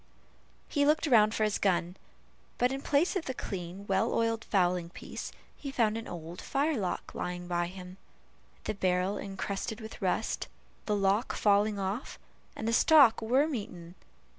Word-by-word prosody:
He 285 - +1
looked 300 +3 +3
round 220 -6 +5
for 215 - +1
his 210 -1 +1
gun, 180 -2 +1 0.6
but 245 +1 +2
in 270 0 -3
place 300 +9 +2
of 375 - -1
the 260 - -3
clean 185 -1 -6
well 195 +3 +1
oiled 230 0 0
fowling 180 -3 +1
piece, - - -7 0.2
he 280 - -7
found 225 -5 +2
an 225 0 -5
old 170 0 -7
firelock 275 - -1
lying 175 0 -4
by 175 -1 0
him, 180 0 -10 0.7
the - - -2
barrel 185 0 0
encrusted 200 +3 -4
with 220 -1 -9
rust, - - -1 0.4
the 210 - +2
lock 200 +3 +1
falling 205 0 +3
off, 195 +5 -3 0.4
and 220 - -4
the 230 - +1
stock 270 -3 +6
worm 265 +7 +2
eaten. 175 -7 -6
205 Hz, 160 wpm, -30 LUFS, 180-240 Hz, 0.7 s, stock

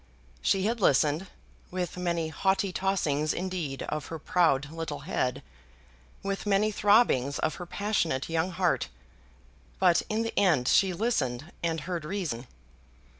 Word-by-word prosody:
She 195 -1 +2
had 230 +2 0
listened, 150 +3 +3 0.4
with 180 -1 -3
many 170 -3 -1
haughty 190 +4 0
tossings 155 -7 0
indeed 175 -7 -3
of 150 -1 -4
her 165 - -5
proud 150 -3 +2
little 160 -3 -5
head, 135 -4 -1 0.8
with 195 +1 -3
many 205 +2 +3
throbbings 200 - +3
of - - 0
her 180 - -7
passionate 170 -10 -1
young 165 +2 0
heart; 180 - 0 0.9
but 180 -2 +4
in 220 +1 0
the 225 - -3
end 160 -11 +3
she 190 +5 +4
listened 170 - -1
and 165 -2 -1
heard 170 +1 -4
reason. 150 - -3
170 Hz, 135 wpm, -28 LUFS, 150-195 Hz, 0.9 s, but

